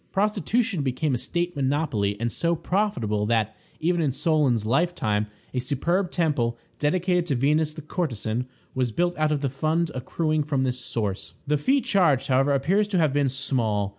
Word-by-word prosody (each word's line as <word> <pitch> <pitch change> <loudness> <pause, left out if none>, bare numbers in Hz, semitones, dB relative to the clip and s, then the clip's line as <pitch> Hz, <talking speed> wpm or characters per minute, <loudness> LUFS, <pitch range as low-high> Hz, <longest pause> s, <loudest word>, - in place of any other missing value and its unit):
Prostitution 210 - +1
became 140 +2 0
a - - +1
state 175 +4 -2
monopoly, 130 -8 0
and 115 0 -1
so 170 +6 0
profitable 125 - 0
that, 110 -1 +1 0.2
even 175 +1 +1
in 150 -4 +1
Solon's 140 - +1
lifetime, 115 -6 +1 0.3
a 130 - 0
superb 170 +9 0
temple, 145 -10 0 0.2
dedicated 180 +3 +1
to 140 - +1
Venus 150 +4 +1
the 155 - -8
courtesan, 125 - -2 0.3
was 130 -2 0
built 175 +8 0
out 155 0 +1
of 145 -2 0
the 140 - +1
fund 155 +4 0
accruing 155 +5 -1
from 140 -3 0
this 125 -1 -1
source. 105 -6 -3
The 150 0 +1
fee 270 - +2
charged, 165 - +2
however, 135 +2 +3
appears 185 +10 +2
to 200 -3 0
have 155 -5 +3
been 145 -1 +2
small. 120 -7 0
145 Hz, 170 wpm, -25 LUFS, 125-170 Hz, 0.3 s, however